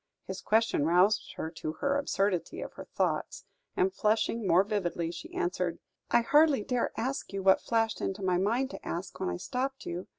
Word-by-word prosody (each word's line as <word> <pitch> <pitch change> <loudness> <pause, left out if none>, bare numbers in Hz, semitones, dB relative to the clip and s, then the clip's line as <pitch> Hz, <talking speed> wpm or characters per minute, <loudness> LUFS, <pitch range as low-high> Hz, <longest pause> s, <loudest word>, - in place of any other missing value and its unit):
His 190 0 -6
question 220 -8 +2
roused 185 +6 +3
her 160 - -4
to 155 -1 -5
the 280 0 +1
absurdity 195 -9 -1
of - - -7
her - - -9
thoughts, - - -2 0.3
and, 380 0 +2
flushing 220 - +1
more 180 +2 +5
vividly, 175 -5 -2
she 170 0 -9
answered: 175 -1 -1 0.3
"I 235 - +4
hardly 290 -1 +4
dare 250 0 0
ask 265 +4 -2
you 195 -1 -3
what 190 0 +5
flashed 225 -1 0
into 195 +1 -3
my 180 -1 +2
mind 240 +8 +1
to - - -9
ask, 175 +2 -5
when - - -1
I 90 - -2
stopped 265 - -3
you. 175 +2 -5
200 Hz, 190 wpm, -30 LUFS, 175-235 Hz, 0.3 s, more